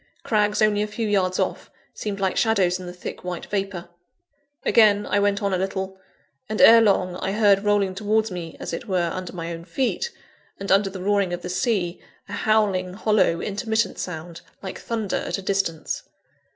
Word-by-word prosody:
Crags 210 -1 +2
only 210 -1 +3
a 210 - 0
few 215 +1 -3
yards 185 -3 +1
off, - - -2 0.2
seemed 205 -2 -4
like 190 -1 0
shadows 190 -5 +2
in 180 - -8
the - - -5
thick 180 0 -8
white 180 -1 -5
vapour. 195 -4 -3 0.8
Again, 210 -2 +5
I 205 - +1
went 205 0 +1
on 200 -1 +1
a 185 - +1
little; 190 0 -3 0.5
and, 215 - -3
ere 230 0 +9
long, 185 -4 +2
I 195 - -2
heard 205 -2 +4
rolling 205 -2 +2
towards 215 +2 0
me, 170 -3 -6
as - - -5
it 200 - -5
were, 175 -4 0
under 185 -1 -5
my 170 -1 -4
own 165 0 -8
feet, 255 - -1 0.5
and 195 - -3
under 195 +1 +4
the 190 -1 -7
roaring 200 -2 +1
of 175 - -4
the 180 - -4
sea, 185 -2 -1 0.3
a - - -8
howling, 195 -4 +1
hollow, 210 -5 +2
intermittent 220 +1 -1
sound 170 -1 -6 0.2
like 190 - -6
thunder 225 -4 -2
at - - -2
a - - -6
distance. 190 -5 -1
195 Hz, 190 wpm, -24 LUFS, 180-210 Hz, 0.8 s, ere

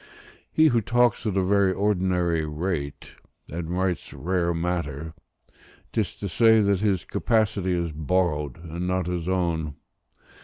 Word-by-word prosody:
He 155 0 +5
who 120 -3 +2
talks 120 +1 +2
at 100 -2 0
a 95 - +3
very 100 0 +3
ordinary 90 -4 +1
rate, 75 -1 -4 0.4
and 80 +1 -4
writes 90 0 -1
rare 85 0 0
matter, 80 -3 -3 0.8
'tis - - -1
to 100 - -5
say 110 +6 +5
that 100 -2 +2
his 100 -3 0
capacity 105 -5 +1
is 85 -2 -1
borrowed 75 -3 0
and 85 +2 -4
not 90 -1 0
his 90 0 -3
own. 85 -5 -1
90 Hz, 140 wpm, -25 LUFS, 80-100 Hz, 0.8 s, He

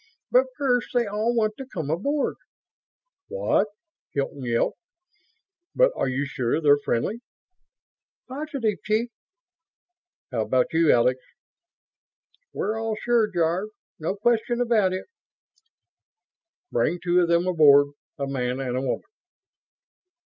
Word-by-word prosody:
But - - +5
first, 250 -4 +1
they 240 -1 +3
all 215 +3 -1
want 215 -2 +1
to 270 - -7
come 160 - -4
aboard...." 280 - 0 0.9
"What?" 480 - +1 0.5
Hilton 140 -1 -3
yelped. 115 -1 0 1.0
"But - - +5
are - - 0
you 135 +3 -1
sure 130 +1 -1
they're 145 -2 +5
friendly?" 205 - -1 1.1
"Positive, 260 - -3
chief." 220 +3 0 1.2
"How 120 -3 -1
about 125 +5 +1
you, 165 -1 +4
Alex?" 125 +2 +3 1.3
"We're 220 +2 -2
all 225 -1 -1
sure, 235 -3 +2
Jarve. 175 +3 0 0.3
No 160 +5 -2
question 235 +3 +1
about 225 -6 +2
it." 185 0 -4 1.7
"Bring 175 - +1
two 180 0 +2
of 175 - +2
them 170 +1 +2
aboard. 145 -5 +5 0.3
A 140 - -2
man 130 -2 -2
and 125 -2 -2
a 130 - 0
woman." 130 - -2
185 Hz, 120 wpm, -25 LUFS, 140-235 Hz, 1.7 s, But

